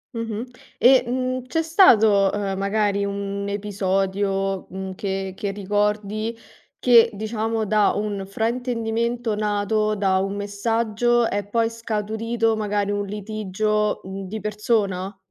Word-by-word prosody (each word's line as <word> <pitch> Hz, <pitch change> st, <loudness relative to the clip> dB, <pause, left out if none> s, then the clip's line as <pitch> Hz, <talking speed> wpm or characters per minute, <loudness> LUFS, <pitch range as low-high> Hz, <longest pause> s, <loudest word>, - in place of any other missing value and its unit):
Mh-mh. 230 Hz, 0 st, -3 dB, 0.3 s
E, 255 Hz, +1 st, +6 dB
mhmm, 255 Hz, 0 st, -2 dB
c'è 325 Hz, +6 st, 0 dB
stato, 220 Hz, -, +5 dB
ehm, 200 Hz, -2 st, -2 dB
magari 200 Hz, 0 st, +1 dB
un 200 Hz, 0 st, -3 dB
episodio, 195 Hz, -1 st, -1 dB
mhmm, 190 Hz, 0 st, -6 dB
che 195 Hz, 0 st, -3 dB
che 200 Hz, -, -3 dB
ricordi 210 Hz, +2 st, -1 dB, 0.4 s
che, 235 Hz, -2 st, +6 dB
diciamo, 220 Hz, +1 st, -2 dB
da 210 Hz, 0 st, +3 dB
un 205 Hz, -1 st, -2 dB
fraintendimento 230 Hz, +1 st, -1 dB
nato 210 Hz, 0 st, 0 dB
da 190 Hz, -2 st, +2 dB
un 195 Hz, +1 st, -2 dB
messaggio 225 Hz, +3 st, +1 dB
è 205 Hz, -1 st, -2 dB
poi 225 Hz, +2 st, +1 dB
scaturito 225 Hz, +1 st, -1 dB
magari 205 Hz, -1 st, -1 dB
un 205 Hz, 0 st, -1 dB
litigio, 210 Hz, 0 st, -1 dB
mhmm, 190 Hz, 0 st, -6 dB
di 220 Hz, +4 st, -5 dB
persona? 210 Hz, -2 st, -1 dB
210 Hz, 120 wpm, -23 LUFS, 200-225 Hz, 0.4 s, E